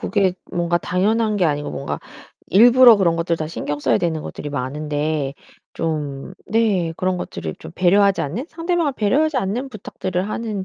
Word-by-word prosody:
그게 195 -4 +1 0.2
뭔가 175 0 +1
당연한 210 +5 +1
게 185 - +2
아니고 145 -1 -1
뭔가 140 - -4 0.5
일부러 240 +4 +7
그런 170 -4 +2
것들 170 0 0
다 155 - -3
신경 145 -2 -4
써야 - - +2
되는 165 -3 -1
것들이 145 - -7
많은데 145 +1 -2 0.4
좀 150 -1 -4
네, 200 -7 +1
그런 185 0 0
것들을 80 - -6
좀 - - -10
배려하지 195 +2 +3
않는 195 - -4
상대방을 330 -3 -1
배려하지 280 +8 +1
않는 240 +6 -2
부탁들을 190 -3 -4
하는 215 -3 -3
185 Hz, 355 characters per minute, -21 LUFS, 155-220 Hz, 0.5 s, 일부러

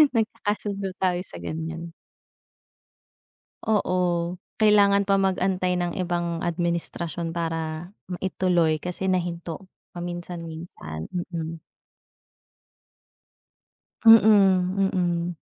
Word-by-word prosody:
Nagkakasundo 205 -3 -1
tayo 180 -2 +1
sa - - -10
ganyan. 165 +1 -5 1.7
Oo, 205 -4 +2 0.6
kailangan 200 -1 +6
pa 195 0 +2
mag-antay 185 -1 +1
ng 175 0 -2
ibang 175 -2 -1
administrasyon 170 -1 -2
para, 165 0 -3 0.2
maituloy 175 -3 +1
kasi 180 +3 -2
nahinto, 175 0 -3 0.2
paminsan-minsan. 170 - -7 0.2
Mm. 165 0 -4 2.5
Mm, 225 0 +12 0.8
mm. 175 -1 0
175 Hz, 75 wpm, -25 LUFS, 165-190 Hz, 2.5 s, Mm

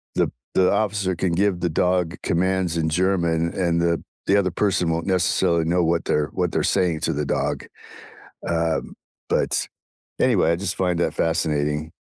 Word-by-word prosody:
the - - +2
p - - -12 0.2
the 90 -1 +4
officer 100 -3 0
can 85 0 -1
give 95 0 +1
the 90 0 0
dog 90 +1 +1
commands 90 0 0
in 80 -1 0
German, 85 -1 +1
and 85 -3 0
the 85 -1 +2
p - - -14 0.3
the 100 - +5
other 95 -2 0
person 90 -2 +1
won't 80 +1 -2
necessarily 90 -2 +2
know 85 +2 +2
what 85 0 0
they're 75 0 0
what - - -1
they're - - 0
saying 90 -4 +1
to - - 0
the 75 +1 -2
dog, - - -2 0.8
um, 85 -1 -1 0.4
but, - - +1 0.6
anyway, 100 -10 +3
I 85 - +2
just 100 +3 -2
find 90 -2 0
that - - 0
fascinating. 75 -1 -1
85 Hz, 180 wpm, -23 LUFS, 80-95 Hz, 0.8 s, the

